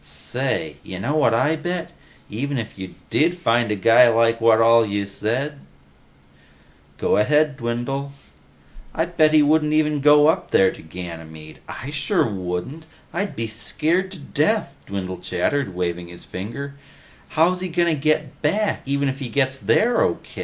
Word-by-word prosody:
"Say, - - -3
you 95 - -8
know 140 +10 -1
what 140 -7 +3
I 150 +7 +2
bet? 175 +2 -4 0.4
Even 135 +6 -3
if 115 -2 -5
you 95 -1 -8 0.2
did 170 +3 +2
find 120 -7 +1
a 105 - 0
guy 115 +5 +6
who's 115 - +2
like 115 0 +2
what 115 -1 +5
all 115 0 +6
you 100 -2 -2
said 125 +9 -3 0.7
..." 70 +1 -31
"Go - - +1
ahead, 150 +6 +3
Dwindle." 130 +3 -3 0.4
"... - - -25
I - - +1
bet 155 -1 +2
he 155 -1 +5
wouldn't 150 +1 +2
even 150 -2 +1
go 150 +1 +6
up 160 - +2
there 95 -1 +4
to - - -12
Ganymede. 80 -2 -9
I 135 - -7
sure 140 -4 +1
wouldn't! 95 - -5 0.3
I'd 195 +4 -3
be 115 - -3
scared 155 - -1
to - - -9
death," 150 +2 -1
Dwindle 95 -2 -5
chattered, 95 +3 -1
waving 90 -1 -3
his 85 0 -11
finger. 135 +9 -6 0.6
"How's 180 +3 +3
he 185 - -3
gonna 170 0 +1
get 155 -1 -1
back, 205 +8 0
even 140 0 0
if 135 0 -3
he 130 -4 -5
gets 135 +2 0
there 235 - +2
O. - - +2
135 Hz, 170 wpm, -22 LUFS, 105-155 Hz, 0.7 s, guy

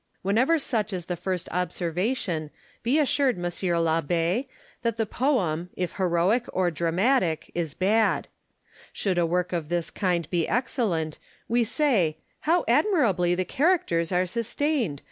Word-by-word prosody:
Landor. - - -6
Whenever 255 +11 +3
such 220 -8 -1
is 180 -2 -4
the 180 - -3
first 180 0 -3
observation, 180 - -1 0.3
be 245 +6 +2
assured, 280 -4 +2
M. 175 - -6
l'Abb6, 170 - 0 0.3
that 230 -2 -1
the 225 - +1
poem, 190 - 0
if 180 -1 -3
heroic 185 +6 +2
or 185 -2 +1
dramatic, 170 - +1
is 165 -4 -3
bad. 215 +4 +2 0.6
Should 185 -3 -1
a 170 - +2
work 180 +2 -1
of 165 -3 -2
this 175 -1 -1
kind 175 -5 0
be 170 -3 +1
excellent, 210 - -1 0.3
we 235 +1 +2
say, 225 - +1
" - - -42
How 345 0 +3
admirably 235 - +3
the 185 +1 -1
characters 255 - +1
are 180 0 +2
sustained 235 - -1
185 Hz, 145 wpm, -26 LUFS, 170-240 Hz, 0.6 s, Whenever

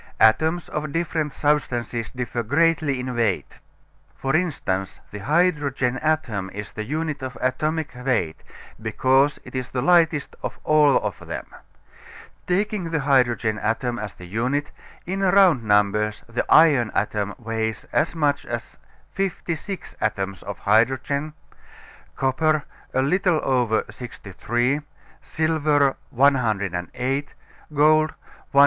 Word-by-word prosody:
Atoms 160 +9 +3
of 150 -1 -4
different 160 -2 -1
substances 120 -7 -1
differ 125 -2 -3
greatly 145 +2 +2
in 125 0 -4
weight. 115 -5 -1 0.6
For 135 +2 -1
instance, 120 - -1
the 105 - -6
hydrogen 140 - +1
atom 120 -12 -1
is 105 0 -6
the 110 - -5
unit 150 +3 -3
of 130 -1 -6
atomic 155 +5 -1
weight, 125 -11 -1 0.4
because 130 +6 +2
it - - -12
is 130 -1 -3
the 125 -1 -2
lightest 165 -2 +3
of - - -5
all 150 -2 +5
of - - -3
them. - - -5 1.0
Taking 200 +1 0
the 165 -2 -1
hydrogen 120 -6 +2
atom 120 +3 -1
as 105 -2 -5
the 90 - -12
unit, 125 +10 -1 0.3
in 190 +2 -3
round 190 -8 +5
numbers 105 0 +2
the 115 +1 -3
iron 145 -8 +6
atom 105 -1 -1
weighs 110 -2 -3
as 120 +7 +1
much 145 -3 +1
as - - -6 0.3
56 190 -1 -4
atoms 100 -3 -2
of 100 0 -6
hydrogen, 130 +7 +1 0.8
copper 150 +3 +1 0.3
a 130 - +3
little 180 +2 +2
over 120 -4 +1
63, 120 +4 -2 0.4
silver 150 -3 +1
108, 125 +1 0 0.4
gold 155 +1 +4
197. - - -16
135 Hz, 120 wpm, -23 LUFS, 115-155 Hz, 1.0 s, iron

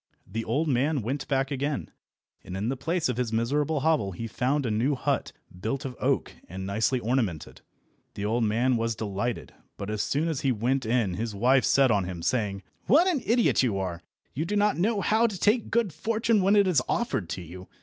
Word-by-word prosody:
The 115 +1 -4
old 155 +7 0
man 140 0 +1
went 135 +6 -3
back 135 0 0
again, 140 +1 -2 0.5
and 90 - -6
in 105 +4 -1
the 135 - -1
place 165 +6 -1
of 125 -2 -2
his 125 -3 -1
miserable 140 +6 0
hovel 130 -11 +1
he 115 - -5
found 135 +5 0
a 115 - 0
new 120 +7 +1
hut - - -1 0.3
built 130 +8 -3
of 130 -2 -5
oak - - 0 0.2
and 95 +2 -6
nicely 110 +6 +1
ornamented. 115 - -2 0.5
The 100 - -3
old 115 +3 +1
man 120 +4 +2
was 115 0 -1
delighted, 110 +2 -3 0.2
but 100 +1 -5
as 105 -1 -1
soon 150 +4 0
as 160 -5 -2
he 135 - +2
went 125 +2 0
in 115 -5 +1
his 110 +3 -3
wife 125 +5 +3
set 135 -3 +4
on 100 -4 +2
him, 90 -2 -6
saying— 105 -5 -1 0.2
"What 295 - +6
an 345 -8 +1
idiot 235 +1 +3
you 115 -7 +1
are! 90 -3 -3 0.3
You 150 - -2
do 200 +5 -2
not 210 0 +3
know 205 +4 +1
how 220 +4 +3
to 205 -4 -5
take 215 +3 +2
good 225 -7 +1
fortune 225 -1 +1
when 195 +2 +4
it 200 -1 +5
is 180 -5 +3
offered 215 - -1
to 90 - -6
you. 90 +3 -10
125 Hz, 210 wpm, -27 LUFS, 110-160 Hz, 0.5 s, What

